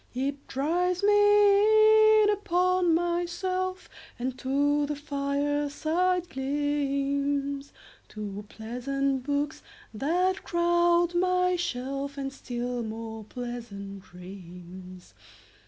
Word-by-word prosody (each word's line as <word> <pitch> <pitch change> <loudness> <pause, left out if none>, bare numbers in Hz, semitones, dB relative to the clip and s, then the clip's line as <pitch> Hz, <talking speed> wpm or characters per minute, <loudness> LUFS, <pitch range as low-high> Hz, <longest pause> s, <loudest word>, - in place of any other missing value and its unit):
It 275 +2 -3
drives 355 +7 0
me 415 +1 +5
in 415 - +4
upon 365 -3 +2
myself 350 +2 -1
5 - - -20 0.3
And 255 +1 -4
to 285 +2 +1
the 295 - -3
fireside 290 +5 -1
gleams, 280 0 -1 0.4
To 210 -1 -7
pleasant 265 +4 -2
books 285 +2 -2 0.3
that 360 - 0
crowd 345 0 +2
my 365 0 +2
shelf, 275 -4 -4
And 270 -1 -4
still 245 -2 -4
more 225 0 -6
pleasant 215 -5 -7
dreams. 180 0 -12
285 Hz, 90 wpm, -27 LUFS, 250-355 Hz, 0.4 s, me